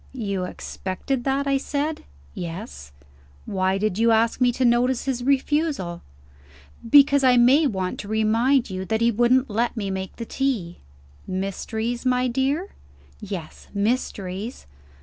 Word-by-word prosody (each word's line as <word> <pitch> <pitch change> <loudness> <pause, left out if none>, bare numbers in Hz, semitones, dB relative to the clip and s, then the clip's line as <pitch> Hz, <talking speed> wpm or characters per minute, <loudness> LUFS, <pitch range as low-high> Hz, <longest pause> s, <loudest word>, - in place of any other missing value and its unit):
"You 200 -7 -2
expected 195 +8 -4
that?" 275 +1 +1
I 275 -1 +2
said. 295 +3 -3 0.3
"Yes." 170 - -7 0.5
"Why 190 0 0
did 210 -1 -1
you 230 +1 +4
ask 225 +2 +2
me 245 -1 +5
to 255 +1 0
notice 240 +1 +2
his 255 -3 -2
refusal?" 275 - 0 0.9
"Because 280 +1 +6
I 250 -1 +5
may 265 +6 +5
want 190 -6 -3
to 205 - -7
remind 225 +5 +2
you 185 0 -3
that 220 +3 -1
he 235 0 +4
wouldn't 245 +4 +3
let 235 +3 0
me 200 -3 -2
make 190 -1 -5
the 230 - -6
tea." 230 -11 -2 0.5
"Mysteries, 220 +5 -3
my 255 0 +2
dear?" 275 +9 0 0.5
"Yes: 190 -7 -7
mysteries." 205 -1 -2
235 Hz, 140 wpm, -23 LUFS, 195-265 Hz, 0.9 s, Because